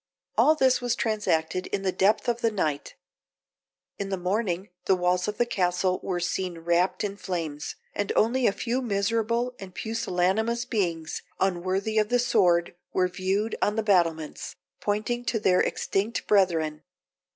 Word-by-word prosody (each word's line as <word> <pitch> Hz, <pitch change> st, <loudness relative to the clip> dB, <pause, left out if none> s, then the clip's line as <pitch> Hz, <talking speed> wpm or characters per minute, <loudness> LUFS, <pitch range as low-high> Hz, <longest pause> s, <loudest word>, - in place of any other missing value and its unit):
All 310 Hz, -, +5 dB
this 260 Hz, -4 st, +3 dB
was 245 Hz, -1 st, 0 dB
transacted 185 Hz, -6 st, 0 dB
in 200 Hz, -1 st, -3 dB
the 190 Hz, -, +1 dB
depth 195 Hz, +6 st, +2 dB
of 240 Hz, 0 st, 0 dB
the 230 Hz, -, +3 dB
night. 155 Hz, -9 st, -2 dB, 1.0 s
In 200 Hz, -1 st, -3 dB
the 195 Hz, -, -1 dB
morning 185 Hz, 0 st, -1 dB, 0.2 s
the 190 Hz, -, +4 dB
walls 180 Hz, +1 st, +1 dB
of 210 Hz, -, -3 dB
the 240 Hz, -, +3 dB
castle 185 Hz, -3 st, 0 dB
were 180 Hz, -2 st, -2 dB
seen 180 Hz, 0 st, -2 dB
wrapt 175 Hz, +3 st, +1 dB
in 200 Hz, -1 st, -2 dB
flames, 160 Hz, -7 st, -4 dB, 0.2 s
and 205 Hz, -1 st, -2 dB
only 240 Hz, +3 st, +3 dB
a -, -, +4 dB
few 245 Hz, +5 st, -2 dB
miserable 230 Hz, +2 st, 0 dB
and 185 Hz, -2 st, -10 dB
pusillanimous 220 Hz, +2 st, 0 dB
beings, 170 Hz, -7 st, -2 dB, 0.2 s
unworthy 190 Hz, +3 st, 0 dB
of 215 Hz, 0 st, +1 dB
the 245 Hz, -, +3 dB
sword, 185 Hz, -9 st, +2 dB, 0.2 s
were 185 Hz, -1 st, +2 dB
viewed 190 Hz, +4 st, -1 dB
on 210 Hz, -, +2 dB
the 220 Hz, -, 0 dB
battlements, 165 Hz, -6 st, 0 dB, 0.2 s
pointing 215 Hz, +4 st, -1 dB
to 225 Hz, -, 0 dB
their 185 Hz, -3 st, +3 dB
extinct 205 Hz, +4 st, -1 dB
brethren. 165 Hz, -6 st, +2 dB
195 Hz, 155 wpm, -26 LUFS, 180-220 Hz, 1.0 s, All